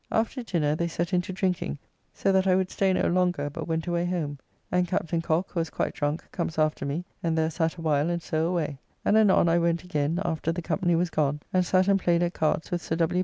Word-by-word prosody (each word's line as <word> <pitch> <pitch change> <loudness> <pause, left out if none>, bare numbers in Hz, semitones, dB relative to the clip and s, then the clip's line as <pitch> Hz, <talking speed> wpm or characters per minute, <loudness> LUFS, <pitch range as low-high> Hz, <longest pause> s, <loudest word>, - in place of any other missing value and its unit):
After 230 +4 0
dinner 160 -9 0
they 170 +2 -1
set 170 +2 -3
in 180 - +4
to 180 - -7
drinking, 180 - -1 0.3
so 195 - 0
that 190 0 +3
I 185 - +5
would 185 0 0
stay 195 -1 +2
no 185 - +1
longer, 175 -5 +1
but - - -6
went 160 -1 -1
away 175 -1 0
home, 155 -6 -2 0.3
and 180 0 +2
Captain 170 0 -1
Cock, 165 +3 0
who 170 - -2
was 165 -1 -1
quite - - -2
drunk, 145 +2 -2
comes 170 -3 -3
after 155 -2 +1
me, 155 +6 -3 0.2
and 165 -1 0
there 160 0 +1
sat 160 0 0
awhile 155 -2 +1
and 175 0 0
so 160 +1 0
away, 160 -6 -2 0.3
and 210 - +4
anon 210 -5 +5
I 170 +1 +4
went 170 0 +1
again 155 -1 -1
after 160 0 -1
the 175 +1 -4
company 175 +1 +1
was 175 +1 0
gone, 150 -1 0
and 185 0 +4
sat 185 +1 +2
and 200 -1 +4
played 175 -1 +2
at 175 0 -1
cards 155 0 0
with 175 -1 -1
Sir 160 - -2
W. 170 +2 +1
170 Hz, 245 wpm, -27 LUFS, 160-180 Hz, 0.3 s, I